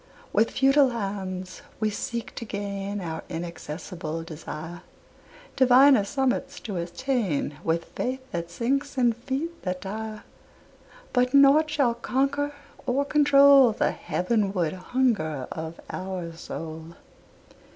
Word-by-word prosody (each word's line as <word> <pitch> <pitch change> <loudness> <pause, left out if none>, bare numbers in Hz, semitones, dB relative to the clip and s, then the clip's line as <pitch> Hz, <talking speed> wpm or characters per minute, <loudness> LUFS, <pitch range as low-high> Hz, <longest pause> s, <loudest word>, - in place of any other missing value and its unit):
With 220 +2 +3
futile 275 +1 +4
hands 190 -5 -4 0.2
we 215 -1 +1
seek 235 +2 -4
to - - -6
gain 200 -1 -4
Our 160 -2 -4
inaccessible 165 -1 -5
desire, 165 +1 -7 0.7
Diviner 260 -2 +6
summits 270 +4 -1
to 205 -5 -5
attain, 175 - -1
With 165 +1 0
faith 255 +1 -3
that 170 -1 -3
sinks 275 +10 -1
and 240 -3 +3
feet 275 +8 -4
that 180 -1 -3
tire; 215 +2 -5 0.9
But 250 +1 +2
nought 280 +3 +6
shall 275 -6 +2
conquer 275 +4 0 0.4
or 270 +3 +1
control 280 -4 +6
The - - +1
heavenward 195 -4 0
hunger 185 - 0
of 160 +1 -6
our 185 -3 -5
soul. 160 0 -7
215 Hz, 115 wpm, -26 LUFS, 175-265 Hz, 0.9 s, Diviner